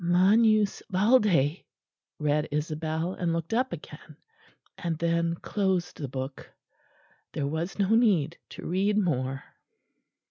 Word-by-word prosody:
"'... - - -10
magnus 205 +4 +4
valde,'" 190 - +3 0.5
read 150 0 0
Isabel; 155 +3 -2
and 175 -3 -1
looked 165 +3 -3
up 255 +3 +1
again; - - -10 0.6
and 170 -2 -3
then 170 0 0
closed 190 -1 -1
the 145 - -4
book. 130 +1 -6 0.8
There 140 - -2
was 160 +5 -3
no 200 -2 +1
need 205 -9 +3
to - - -9
read 195 +4 +1
more. 135 -8 -1
170 Hz, 120 wpm, -27 LUFS, 155-200 Hz, 0.8 s, magnus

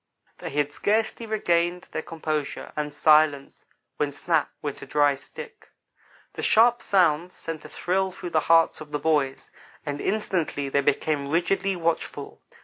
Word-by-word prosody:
They - - -5
had 145 0 -1
scarcely 220 +4 0
regained 175 -4 0
their - - -3
composure 155 -3 -4
and 150 -1 -2
silence 150 -1 +3 0.4
when, 145 -1 0
"snap!" 160 +2 0
went 145 -2 -5
a - - -9
dry 145 -1 +3
stick. 455 - -11 0.6
The - - -6
sharp 235 +2 +4
sound 175 -2 +2
sent 165 -2 -7
a - - -9
thrill 190 +1 0
through 180 -1 -7
the 160 - +3
hearts 165 -1 +4
of 155 - -9
the 150 - 0
boys, 145 -3 0 0.3
and 145 -1 -4
instantly 175 -9 -1
they 140 +1 +2
became 140 0 0
rigidly 190 +4 +1
watchful. 170 -1 -3
160 Hz, 150 wpm, -25 LUFS, 145-180 Hz, 0.6 s, sharp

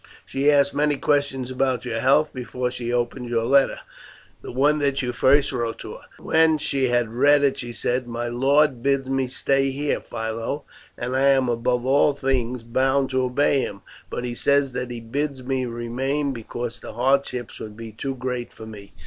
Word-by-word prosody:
She 140 +2 +1
asked 140 -1 +3
many 145 0 +1
questions 135 -3 0
about 130 -1 0
your 115 -2 -2
health 145 +5 +3
before 125 0 -3
she 120 -1 -4
opened 120 0 -2
your 115 -1 +1
letter, 135 +3 +3 0.6
the - - -8
one 145 +4 +2
that 140 -1 0
you 125 - -1
first 140 +4 +3
wrote 120 -3 -2
to - - -7
her. - - -13
When 160 -1 +3
she 140 -3 0
had 120 -2 0
read 145 +3 +4
it 140 -1 +2
she 120 -1 -5
said, 125 +2 -1
'My 120 0 -3
lord 135 +2 +2
bids 135 0 +1
me 135 -1 0
stay 135 +1 +1
here, 145 +2 -1
Philo, 115 +6 -4 0.3
and 125 +2 -3
I 135 +1 +3
am, 135 -2 +4
above 120 +1 0
all 140 +2 +4
things, 125 -3 -1
bound 130 +3 +1
to 130 0 +1
obey 135 +2 +2
him; 100 -5 -5 0.3
but 125 - -4
he 120 - -3
says 140 +2 +2
that 125 0 -4
he 120 -1 -5
bids 135 +3 -3
me 130 0 -1
remain, 130 +5 -2
because 120 0 -6
the - - -9
hardships 125 -1 0
would 105 -1 -8
be 115 -1 -8
too 135 +5 -4
great 125 -1 -4
for 110 - -11
me. 100 -3 -11
130 Hz, 190 wpm, -23 LUFS, 120-140 Hz, 0.6 s, read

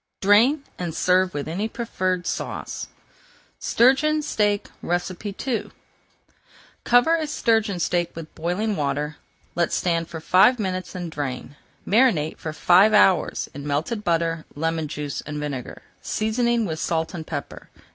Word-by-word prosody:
Drain 230 +9 +4 0.2
and 170 -3 -4
serve 185 -1 +2
with 145 - -3
any 190 +7 -2
preferred 185 -6 -2
sauce. - - -4 0.7
STURGEON 300 +5 +3
STEAK 205 -7 0 0.2
II 195 +7 -3 1.1
Cover 245 +7 +4
a 315 -2 -2
sturgeon 220 -9 +1
steak 175 0 0
with 165 -1 -9
boiling 180 +6 -1
water, 145 0 -2 0.4
let 170 0 0
stand 170 -2 0
for 165 - -7
five 190 +10 +5
minutes, 185 -3 -3
and 175 -2 -5
drain. 140 -2 -5 0.3
Marinate 205 - +2
for 155 - -4
five 185 +7 +5
hours 190 -3 +3
in 140 +1 -7
melted 160 +10 -2
butter, 165 -2 0
lemon 160 +1 -1
juice, 145 -1 -4
and 150 0 -6
vinegar, 140 -4 -5 0.2
seasoning 235 +1 0
with 160 -4 -4
salt 160 0 -1
and 160 -3 -6
pepper. 145 -3 -6
180 Hz, 135 wpm, -23 LUFS, 160-215 Hz, 1.1 s, five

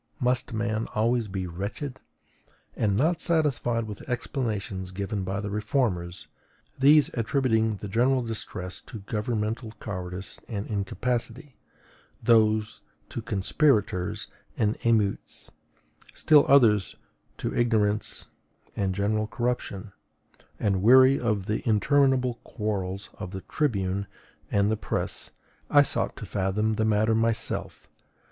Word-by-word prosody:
Must 125 0 0
man 110 0 -1
always 115 +1 +1
be 95 -1 -3
wretched? 100 - -5 0.8
And 100 -2 +1
not 160 +7 +2
satisfied 140 -8 +1
with 105 -2 -7
the - - -12
explanations 105 -7 -3
given 100 +2 -3
by 95 +2 -2
the 105 -1 -4
reformers, 105 -5 -1 0.5
these 145 +2 +6
attributing 115 -2 +1
the 105 - -7
general 125 +5 +2
distress 95 -5 -5
to 110 - -8
governmental 110 +2 -3
cowardice 90 -2 -6
and 105 -3 -4
incapacity, 120 +6 -3 0.6
those 110 -2 +3 0.3
to 120 - -5
conspirators 105 - +1 0.3
and 105 0 +1
emeutes, 110 -4 0 0.6
still 150 -2 +5
others 110 - +4 0.4
to - - -3
ignorance 110 -3 +1 0.5
and 95 -2 -1
general 105 +2 0
corruption, 115 -4 -3 0.7
and 100 -3 +1
weary 130 +5 +7
of 105 -5 0
the 105 +2 -1
interminable 130 +2 +3
quarrels 100 -3 -4
of 95 -3 -5
the 95 0 -6
tribune 100 -9 -1 0.4
and 100 +1 +2
the 110 - 0
press, - - -3 0.4
I 145 -1 +7
sought - - -2
to - - -7
fathom 100 +3 0
the 110 0 0
matter 110 +1 +3
myself. 115 0 -1
110 Hz, 120 wpm, -27 LUFS, 100-120 Hz, 0.8 s, weary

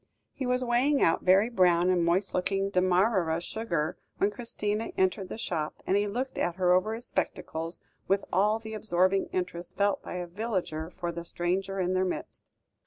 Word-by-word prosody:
He 265 - -4
was 250 0 +1
weighing 255 +4 +3
out 165 - +3
very 190 +4 +5
brown 180 -5 +3
and 175 -2 +2
moist 180 +4 +1
looking 195 +2 0
Demarara 185 -2 +2
sugar 175 -5 -2 0.2
when 200 - +2
Christina 210 -1 -2
entered 190 0 +1
the - - -5
shop, 160 -8 -2
and 190 - +2
he 205 +1 +2
looked 250 +6 -3
at 175 -1 0
her 180 -1 +3
over 215 +5 +2
his 235 +2 -6
spectacles, 165 +2 -3 0.3
with 195 +1 +1
all 210 +4 +3
the 220 -1 -8
absorbing 195 -2 +2
interest 180 -1 -4
felt 200 0 +2
by - - -7
a 180 0 -3
villager 175 -5 -3
for 175 -1 -4
the 170 0 -6
stranger 185 +3 -2
in 185 0 +1
their 185 0 +2
midst. 185 - -5
185 Hz, 180 wpm, -29 LUFS, 175-215 Hz, 0.3 s, very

